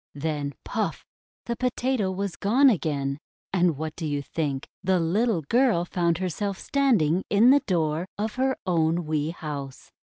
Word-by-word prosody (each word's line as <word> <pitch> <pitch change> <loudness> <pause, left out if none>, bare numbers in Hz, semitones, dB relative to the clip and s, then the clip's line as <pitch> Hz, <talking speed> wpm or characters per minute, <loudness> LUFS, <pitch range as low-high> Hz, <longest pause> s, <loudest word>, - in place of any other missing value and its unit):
Then 145 -1 -3
— - - -58
puff! - - -3 0.4
the 235 - -2
Potato 250 -3 0
was 190 -1 -3
gone 250 +9 +4
again, 140 -7 -1 0.3
and 175 -5 +2
what 155 +1 -4
do 160 - -4
you 145 -1 -2
think? 140 -3 -3 0.2
The 190 -1 +2
little 185 +2 +1
girl 230 - +2
found 170 -2 0
herself 185 +2 -2
standing 200 - +2
in 220 +5 +6
the 285 - +6
door 165 -2 0
of 210 +1 -2
her 265 +1 0
own 165 -1 +1
wee 155 0 -1
house. 145 -5 -7
175 Hz, 160 wpm, -26 LUFS, 155-210 Hz, 0.4 s, in